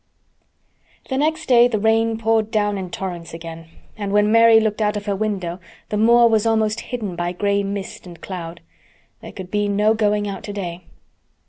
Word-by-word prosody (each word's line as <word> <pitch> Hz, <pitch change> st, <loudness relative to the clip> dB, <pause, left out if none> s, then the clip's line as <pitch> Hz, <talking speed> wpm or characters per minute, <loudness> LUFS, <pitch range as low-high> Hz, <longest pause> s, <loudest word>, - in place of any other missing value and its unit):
The 265 Hz, -, -1 dB
next 315 Hz, +2 st, 0 dB
day 245 Hz, -1 st, +6 dB
the 235 Hz, -3 st, -1 dB
rain 225 Hz, +1 st, +2 dB
poured 225 Hz, -1 st, +1 dB
down 205 Hz, -2 st, 0 dB
in 185 Hz, -1 st, -5 dB
torrents 175 Hz, -3 st, -6 dB
again, 165 Hz, 0 st, -9 dB, 0.3 s
and 205 Hz, -2 st, -4 dB
when 210 Hz, +1 st, +3 dB
Mary 230 Hz, 0 st, +7 dB
looked 220 Hz, -1 st, -1 dB
out 210 Hz, 0 st, +1 dB
of 205 Hz, -, -6 dB
her 200 Hz, -2 st, -1 dB
window 190 Hz, -4 st, -3 dB, 0.3 s
the -, -, -2 dB
moor 235 Hz, +2 st, +5 dB
was 220 Hz, -1 st, +2 dB
almost 220 Hz, 0 st, +1 dB
hidden 215 Hz, -8 st, -5 dB
by 175 Hz, +1 st, -2 dB
gray 200 Hz, +2 st, 0 dB
mist 200 Hz, -1 st, -6 dB
and 175 Hz, -1 st, -12 dB
cloud. 170 Hz, -3 st, -7 dB, 0.6 s
There -, -, -9 dB
could 185 Hz, -2 st, -9 dB
be 205 Hz, 0 st, 0 dB
no 210 Hz, +2 st, +2 dB
going 210 Hz, -1 st, +1 dB
out 195 Hz, -2 st, -5 dB
today. 180 Hz, -4 st, -6 dB
205 Hz, 185 wpm, -21 LUFS, 190-220 Hz, 0.6 s, Mary